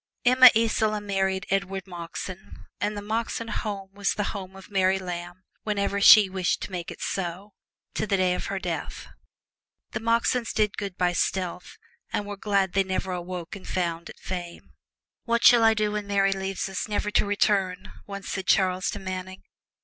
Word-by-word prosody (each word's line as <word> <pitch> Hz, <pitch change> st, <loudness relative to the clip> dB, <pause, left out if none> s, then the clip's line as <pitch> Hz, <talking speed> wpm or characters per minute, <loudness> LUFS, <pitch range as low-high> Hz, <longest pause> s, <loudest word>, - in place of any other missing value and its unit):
Emma 255 Hz, +1 st, +9 dB
Isola 220 Hz, -1 st, +1 dB
married 190 Hz, -2 st, -1 dB
Edward 195 Hz, -1 st, -1 dB
Moxon, 180 Hz, +2 st, -8 dB
and 210 Hz, 0 st, -1 dB
the 205 Hz, -, -5 dB
Moxon 230 Hz, +1 st, -2 dB
home 200 Hz, -2 st, -4 dB
was 200 Hz, -1 st, -1 dB
the 205 Hz, -, -1 dB
home 190 Hz, -2 st, -7 dB
of 195 Hz, +1 st, -13 dB
Mary 190 Hz, -1 st, +3 dB
Lamb 175 Hz, 0 st, -6 dB, 0.2 s
whenever 200 Hz, -1 st, -1 dB
she 210 Hz, 0 st, +9 dB
wished 185 Hz, -1 st, -1 dB
to -, -, -6 dB
make 175 Hz, -2 st, -4 dB
it -, -, -9 dB
so, 190 Hz, +2 st, -4 dB, 0.4 s
to -, -, -2 dB
the 195 Hz, -, +2 dB
day 185 Hz, -1 st, +2 dB
of -, -, -4 dB
her 195 Hz, -, -2 dB
death. 175 Hz, -3 st, -5 dB, 0.8 s
The -, -, -3 dB
Moxons 230 Hz, +1 st, +1 dB
did 210 Hz, -2 st, +1 dB
good 200 Hz, -3 st, -5 dB
by 180 Hz, -1 st, +2 dB
stealth, 180 Hz, 0 st, -2 dB, 0.3 s
and 205 Hz, -, -1 dB
were 205 Hz, 0 st, -5 dB
glad 195 Hz, -2 st, 0 dB
they 195 Hz, -, +3 dB
never 190 Hz, 0 st, -2 dB
awoke 180 Hz, -1 st, -5 dB
and 195 Hz, -, -11 dB
found 170 Hz, -2 st, -2 dB
it -, -, -11 dB
fame. 175 Hz, -2 st, -7 dB, 0.5 s
"What 235 Hz, 0 st, +1 dB
shall 240 Hz, -2 st, +8 dB
I 225 Hz, 0 st, +5 dB
do 210 Hz, -1 st, 0 dB
when 210 Hz, -1 st, -3 dB
Mary 195 Hz, -1 st, +2 dB
leaves 195 Hz, 0 st, -3 dB
me, 190 Hz, -, -9 dB, 0.2 s
never 210 Hz, 0 st, -1 dB
to -, -, +3 dB
return?" 200 Hz, -2 st, 0 dB, 0.2 s
once 200 Hz, -1 st, -7 dB
said 190 Hz, -1 st, -4 dB
Charles 185 Hz, 0 st, +2 dB
to -, -, -3 dB
Manning. 185 Hz, 0 st, -6 dB
195 Hz, 180 wpm, -26 LUFS, 185-210 Hz, 0.8 s, Emma